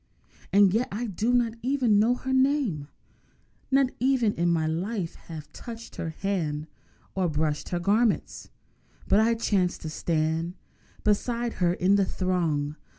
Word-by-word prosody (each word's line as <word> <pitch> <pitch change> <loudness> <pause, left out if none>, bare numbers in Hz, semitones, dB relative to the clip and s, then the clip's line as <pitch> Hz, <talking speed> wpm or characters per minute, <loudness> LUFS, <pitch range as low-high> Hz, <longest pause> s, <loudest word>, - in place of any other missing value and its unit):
And 195 -1 +5
yet 235 +4 +1
I 225 +4 -3
do 220 +3 -1
not 240 -2 +2
even 250 -5 +2
know 235 +4 +3
her 265 +1 -3
name, 260 - +1 0.8
Nor 270 0 +4 0.2
ever 260 -2 +3
in 175 -5 +1
my 165 -2 +2
life 175 +3 -2
have 155 -3 -10
touched 230 -1 -9
her 165 - -3
hand 160 -4 -2 0.5
Or 185 -2 0
brushed 150 -1 -1
her 175 - -1
garments. 210 +5 +1 0.6
But 200 - +4
I 230 +1 +3
chanced 195 -5 0
to 155 - -5
stand 160 +2 -1 0.5
Beside 235 +3 0
her 175 -1 +3
in 195 +3 +3
the 200 - +3
throng! 160 -6 -1
195 Hz, 150 wpm, -27 LUFS, 165-235 Hz, 0.8 s, And